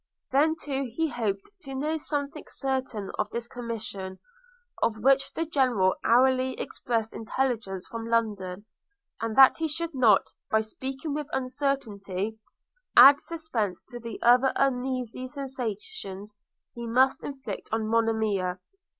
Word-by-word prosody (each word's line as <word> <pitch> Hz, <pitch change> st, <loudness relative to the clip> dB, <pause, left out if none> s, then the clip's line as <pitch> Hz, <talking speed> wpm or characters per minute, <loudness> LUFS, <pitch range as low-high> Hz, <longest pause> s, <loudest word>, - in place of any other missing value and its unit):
Then 300 Hz, +4 st, +4 dB
too 275 Hz, -4 st, -3 dB
he 325 Hz, -1 st, +1 dB
hoped 215 Hz, -, -3 dB
to 270 Hz, -6 st, -8 dB
know 300 Hz, +4 st, -1 dB
something 290 Hz, 0 st, -3 dB
certain 260 Hz, -7 st, -3 dB
of 210 Hz, -, 0 dB
this 235 Hz, +1 st, -4 dB
commission, 220 Hz, -6 st, -5 dB, 0.6 s
of 220 Hz, -, +1 dB
which 270 Hz, +4 st, +3 dB
the 330 Hz, -, -1 dB
General 250 Hz, -, +2 dB
hourly 260 Hz, +2 st, +3 dB
expected 225 Hz, -2 st, -2 dB
intelligence 225 Hz, -5 st, -2 dB
from 230 Hz, 0 st, -6 dB
London; 205 Hz, -4 st, -1 dB, 0.6 s
and 225 Hz, -1 st, -2 dB
that 270 Hz, +2 st, +8 dB
he 325 Hz, -, +1 dB
should 325 Hz, +2 st, -2 dB
not, 235 Hz, -7 st, +4 dB, 0.2 s
by 220 Hz, -, +3 dB
speaking 265 Hz, +6 st, -5 dB
with 295 Hz, -1 st, -3 dB
uncertainty, 225 Hz, -7 st, -2 dB, 0.6 s
add 280 Hz, +1 st, +10 dB
suspense 255 Hz, -, -3 dB
to 240 Hz, -2 st, -7 dB
the 230 Hz, -1 st, -7 dB
other 250 Hz, +2 st, +6 dB
uneasy 255 Hz, -2 st, -1 dB
sensations 215 Hz, -7 st, -5 dB, 0.4 s
he 235 Hz, 0 st, -6 dB
must 260 Hz, +3 st, +3 dB
inflict 265 Hz, -8 st, -6 dB
on 220 Hz, 0 st, 0 dB
Monimia. 220 Hz, -5 st, +1 dB
245 Hz, 130 wpm, -27 LUFS, 215-270 Hz, 0.6 s, add